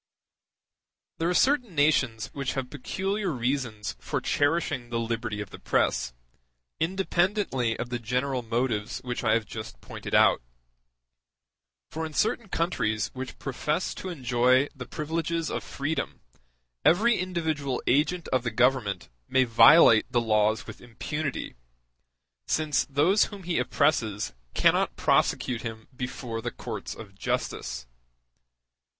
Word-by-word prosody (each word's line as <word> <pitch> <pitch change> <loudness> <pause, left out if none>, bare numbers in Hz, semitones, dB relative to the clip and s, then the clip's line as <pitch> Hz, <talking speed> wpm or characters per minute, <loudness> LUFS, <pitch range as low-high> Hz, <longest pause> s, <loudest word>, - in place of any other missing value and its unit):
There 165 +1 +1
are - - +1
certain 250 - +2
nations 130 -7 +2
which 140 -2 -2
have 135 -2 -4
peculiar 195 +8 -2
reasons 120 - -2
for - - -2
cherishing 145 -4 0
the 115 -1 -1
liberty 115 -2 -2
of 100 - -8
the - - -10
press, - - +1 0.7
independently 175 - 0
of 120 - -4
the 120 -1 -2
general 125 +3 -1
motives 115 -2 -1
which 125 0 -4
I 110 -2 +3
have 115 -1 0
just 110 - -8
pointed - - -5
out. - - +5 1.5
For 160 - -4
in 160 -1 -5
certain 220 +4 0
countries 110 -13 -1
which 130 0 -6
profess 150 +5 -2
to 185 - -6
enjoy 130 -2 +2
the 130 - -8
privileges 165 +1 -2
of - - -3
freedom 145 +3 -3 0.6
every 220 +7 +4
individual 160 -7 -2
agent 160 +6 +2
of 130 - +2
the 120 - -2
Government 120 -5 +1 0.2
may 130 - +4
violate 115 0 +7
the 120 - +3
laws 110 -1 +2
with - - -10
impunity, 140 +4 -4 0.9
since 155 -4 +1
those 160 +10 +4
whom 200 -3 -9
he 175 0 0
oppresses 110 -9 +1 0.2
cannot - - +3
prosecute 120 -2 +1
him 110 -2 -7
before 125 -3 -4
the 120 - -2
courts - - -6
of 100 -3 -11
justice. 65 -8 -3
130 Hz, 130 wpm, -27 LUFS, 115-160 Hz, 1.5 s, violate